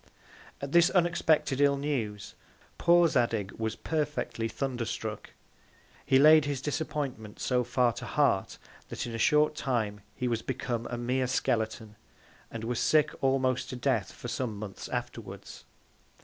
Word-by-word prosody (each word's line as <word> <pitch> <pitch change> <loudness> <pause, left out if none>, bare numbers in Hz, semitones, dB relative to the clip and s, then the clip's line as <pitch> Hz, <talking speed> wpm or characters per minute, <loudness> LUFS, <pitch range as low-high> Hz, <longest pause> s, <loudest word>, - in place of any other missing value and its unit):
At 140 0 -5
this 170 +2 +6
unexpected 165 -6 +2
ill 140 -1 +4
News, 115 -8 -3 0.5
poor 175 0 +5
Zadig 115 -8 0
was 110 -1 -2
perfectly 145 -7 -2
thunder 125 +2 -3
struck: 110 -2 -5 0.7
He 130 - +4
laid 155 +2 +7
his 145 -2 -2
Disappointment 140 -6 -4
so 125 -1 +1
far 125 0 +2
to - - -7
Heart, - - +1 0.3
that - - -4
in 120 - -6
a 115 - -4
short 150 +5 +4
Time 115 -8 -2
he 125 - -2
was 115 -2 -1
become 120 -2 -3
a 120 - -4
mere 125 +2 0
Skeleton, 110 -3 -1 0.5
and 115 -1 -7
was 120 +1 -2
sick 155 -1 +3
almost 130 -1 +1
to 130 - -5
death 125 -6 0
for - - -9
some 120 -3 -3
Months 100 -2 -7
afterwards. - - -6
125 Hz, 150 wpm, -29 LUFS, 115-145 Hz, 0.7 s, laid